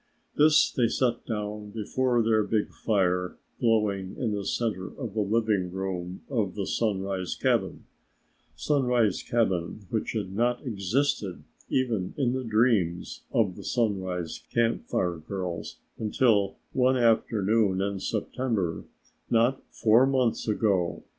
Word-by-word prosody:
This 150 +1 +5
they 120 -3 +2
set 120 0 0
down 105 -1 -4
before 120 +3 0
their 110 -1 +3
big 105 +1 0
fire 90 -4 0 0.2
glowing 105 -5 +1
in 120 -4 -1
the 100 -1 -2
center 105 -6 -1
of 120 -7 -7
the 110 - 0
living 105 -3 +1
room 95 -1 -4
of 110 -9 -1
the 100 -2 -2
Sunrise 95 -4 -1
cabin - - 0 0.7
Sunrise 125 -8 +1
cabin 100 -5 -1
which 110 - -1
had 100 -4 -3
not 120 +5 0
existed 105 -2 -1 0.3
even 115 -8 0
in 130 -4 +1
the 130 0 -2
dreams 110 -7 +1
of 100 -6 +1
the - - -9
Sunrise 95 -8 -1
Camp 115 -1 +1
Fire 90 -2 0
girls 90 +1 -5 0.2
until 105 -3 +2 0.2
one 130 0 +3
afternoon 110 -4 +2
in 100 0 -1
September 110 -7 -2 0.4
not 120 +3 +2
four 115 +4 +4
months 130 -5 +1
ago. 100 -6 +1
110 Hz, 125 wpm, -27 LUFS, 95-120 Hz, 0.7 s, This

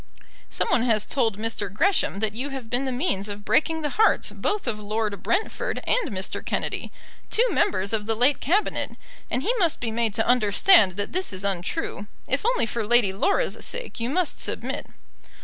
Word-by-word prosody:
Some - - 0
one 240 - +3
has 220 -3 +2
told 225 -7 0
Mr. 215 -3 -2
Gresham 270 - +1
that 215 -1 +1
you 255 +6 -3
have 265 -5 -7
been 250 +2 0
the 260 - -1
means 245 - -1
of 205 0 -7
breaking 320 0 +2
the 295 - -1
hearts 440 - +3
both 415 -1 -2
of 225 -4 -2
Lord 210 -1 -2
Brentford 440 +5 -1
and 480 - +1
Mr. 190 -3 -3
Kennedy, - - -3 0.4
two 475 +3 +3
members 195 +2 +1
of 210 -1 -1
the 225 - +1
late 255 +5 +3
Cabinet, 385 +9 0 0.3
and 255 - -1
he 475 - +1
must 340 -5 +2
be 230 -2 -3
made 225 -2 0
to 225 - +1
understand 225 - +5
that 205 +2 -2
this 370 +2 -1
is 190 0 -4
untrue. 200 - -2 0.2
If - - 0
only - - +2
for 230 0 -3
Lady 235 -4 +4
Laura's 400 - 0
sake - - -5
you 230 +1 -1
must 350 +3 0
submit." - - -4
235 Hz, 190 wpm, -25 LUFS, 210-320 Hz, 0.4 s, understand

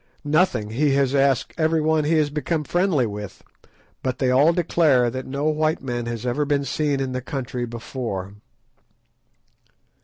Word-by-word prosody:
"Nothing; 145 - +1
he 140 +4 +2
has 135 -1 +2
asked 135 -3 +2
everyone 160 -1 +2
he 160 +2 +2
has 150 -2 +1
become 150 +2 -1
friendly 175 -5 +1
with, 105 -2 -7 0.6
but 130 -1 -2
they 130 -1 +1
all 140 +6 +5
declare 155 -8 +2
that 130 +1 -5
no 140 +2 -3
white 155 0 +1
man 120 -2 -3
has 120 0 -4
ever 125 +4 0
been 140 -1 0
seen 145 +1 0
in 135 -1 -2
the 130 0 -3
country 125 -2 -4
before." 115 -4 -5
135 Hz, 155 wpm, -23 LUFS, 125-155 Hz, 0.6 s, all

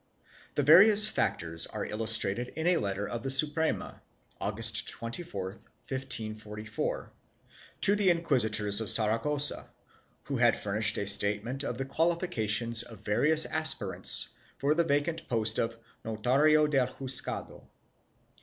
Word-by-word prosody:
The 145 - -2
various 200 +8 +7
factors 80 - -4
are - - -8
illustrated 110 +1 0
in 160 +1 -7
a 180 -1 0
letter 100 -2 -6
of 120 - -8
the 135 - -7
Suprema, 150 +4 -2 0.4
August 110 +3 +1
24, 115 - -7 0.4
1544, 110 -5 -7 0.7
to 200 - +1
the 205 -2 0
inquisitors 110 - 0
of 110 - -2
Saragossa 115 +7 +3 0.5
who 140 - -7
had 120 -2 0
furnished 110 +2 -2
a 100 - -4
statement 105 +7 +2
of 120 -3 -7
the 135 - -6
qualifications 130 - +2
of 115 -4 -9
various 155 +10 +4
aspirants 155 -11 +3 0.3
for 140 +2 -2
the 170 +2 -1
vacant 155 +2 -4
post 110 -2 -2
of 115 0 -5 0.3
notario 135 +8 -1
del 135 -4 -2
juzgado. 130 0 -4
120 Hz, 125 wpm, -26 LUFS, 110-150 Hz, 0.7 s, various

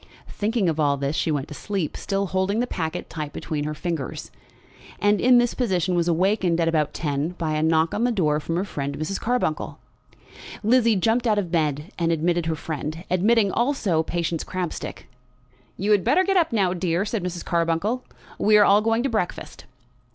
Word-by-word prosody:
Thinking 215 -1 0
of 160 -1 0
all 145 -2 +2
this, 140 +2 -2
she - - 0
went 145 -2 -1
to - - -7
sleep, 190 0 -3
still 200 0 -2
holding 190 +3 0
the 245 - +1
packet 165 -6 -4
tight 150 -2 -5
between 150 -3 -3
her 150 0 -3
fingers, 160 -3 -4 0.7
and 205 0 +2
in 250 0 +6
this 240 0 +2
position 185 -7 0
was 170 -1 +1
awakened 180 0 +2
at 165 - +2
about 155 -3 +1
ten 150 +2 -2
by 160 -3 -2
a 155 - 0
knock 160 +1 +2
at 220 - 0
the 245 - +2
door 155 -9 +1
from 165 +2 -3
her 185 +3 0
friend 140 -6 -4
Mrs. 155 +6 -3
Carbuncle. 235 -10 -1 0.9
Lizzie 230 0 +4
jumped 230 +5 +1
out 215 -2 +3
of 185 -5 -1
bed, 150 -2 -1
and 170 -1 +1
admitted 165 +1 0
her 160 - 0
friend, 155 +1 -5
admitting 200 +3 +3
also 235 - +1
Patience 165 0 -2
Crabstick. 180 -2 -5 0.7
"You 200 +3 0
had 205 -3 +4
better 370 - +3
get 390 +1 0
up 340 -3 +3
now, 195 -5 +2
dear," 175 +1 0
said 215 -3 -3
Mrs. 180 -1 -4
Carbuncle. 170 +8 0 0.4
"We 210 0 +5
are 205 - +6
all 205 +1 +5
going 225 +2 +1
to 275 - 0
breakfast." 215 -7 -3
180 Hz, 195 wpm, -24 LUFS, 160-210 Hz, 0.9 s, in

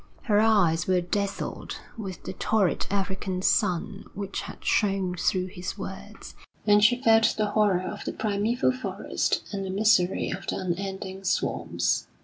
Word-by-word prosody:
Her 205 -2 +3
eyes 200 -7 +3
were 185 -1 +3
dazzled 200 +3 -3 0.2
with 195 -6 -7
the 185 - -5
torrid 200 -1 +1
African 190 -1 -2
sun 200 0 +1
which 200 0 -4
had - - -10
shone 195 -3 +1
through 185 +1 +1
his 185 -1 -6
words, - - -8 0.3
and 205 0 +5
she 245 +3 +5
felt 225 -1 +5
the 210 -1 0
horror 210 -4 +3
of 205 +2 -5
the - - -3
primeval 220 +4 +1
forest 255 0 -2
and 200 -1 -3
the 190 - -4
misery 195 -2 +2
of 190 - -6
the - - -1
unending 190 +1 -4
swamps. 190 - 0
195 Hz, 150 wpm, -26 LUFS, 185-210 Hz, 0.3 s, and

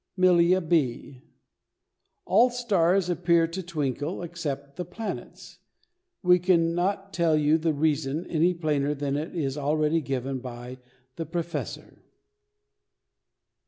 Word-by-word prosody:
MILLIA 185 0 +4
B. 145 -5 -1 1.0
All 230 +7 +5
stars 195 -7 +1
appear 170 -1 +3
to 165 +3 -5
twinkle 155 -1 -3
except 145 -5 -5
the 180 - -4
planets. 210 +6 -7 0.6
We 180 0 +5
can 170 -2 +2
not 195 +3 -1
tell 165 -3 +2
the 155 +2 +2
reason 150 +1 0
any 170 +2 +1
plainer 150 -3 0
than 140 -1 -2
it 155 +4 -4
is 145 -3 -2
already 155 +2 +1
given 135 -1 -3
by 125 0 -8 0.4
the 165 -2 -4
"Professor." 170 +1 -5
165 Hz, 115 wpm, -26 LUFS, 145-180 Hz, 1.0 s, All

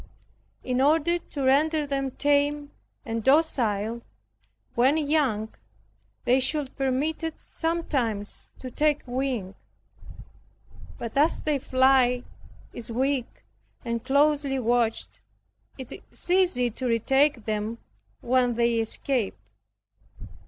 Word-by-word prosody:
In 255 0 0
order 320 +4 +3
to 285 -4 -6
render 300 +3 +3
them 275 -1 -2
tame 290 +1 +1 0.3
and 225 -1 -3
docile 235 -7 +2 0.7
when 260 +6 +3
young, 280 -8 0 0.7
they 250 +2 +4
should 280 +1 -1
be 270 - -2
permitted 310 +5 -1
sometimes 270 -11 -2
to 255 - -8
take 300 +2 +1
wing, 245 -6 -2 1.4
but 230 -2 -6
as 295 +4 +2
their 300 -2 +1
flight 255 -1 +3 0.5
is 235 -1 -6
weak, 260 +1 -1 0.4
and 235 -1 -2
closely 280 +1 +2
watched, 235 -2 0 0.6
it 260 -3 -9 0.2
is - - -4
easy 355 -10 +3
to 255 +3 -4
retake 265 +2 +2
them 215 +1 -2 0.4
when 245 -1 +2
they 235 0 +2
escape. 225 0 -1
265 Hz, 105 wpm, -26 LUFS, 235-290 Hz, 1.4 s, they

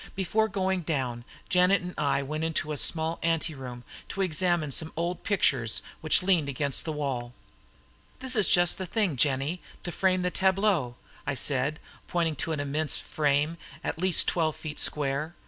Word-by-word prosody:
Before 215 +4 +1
going 190 -3 -1
down, 130 -7 -2 0.2
Janet 180 +1 +4
and 180 0 -6
I 140 -1 +1
went 155 +3 -3
into 155 -1 -1
a 150 - -2
small 160 +3 +2
anteroom 145 -7 -2 0.3
to 195 - -1
examine 175 -3 0
some 160 +4 -2
old 170 +1 -2
pictures 130 - +1 0.2
which 155 +3 +3
leaned 175 -6 +2
against 140 0 -1
the 160 - -2
wall. 130 -5 -3 0.8
"This 260 0 +1
is 210 -3 +4
just 175 +1 +4
the 185 - -3
thing, 200 -5 0
Jennie, 140 +6 0 0.2
to 175 - -4
frame 185 0 +1
the 180 - +1
tableaux," 190 - +2 0.3
I 145 - 0
said, 140 +3 0 0.3
pointing 165 -3 0
to 165 - -2
an 155 - -2
immense 145 +2 -1
frame, 150 +2 0 0.3
at - - -3
least 185 0 +4
twelve 160 -3 +1
feet 155 -1 -6
square. 150 +3 +1
160 Hz, 165 wpm, -28 LUFS, 140-180 Hz, 0.8 s, Janet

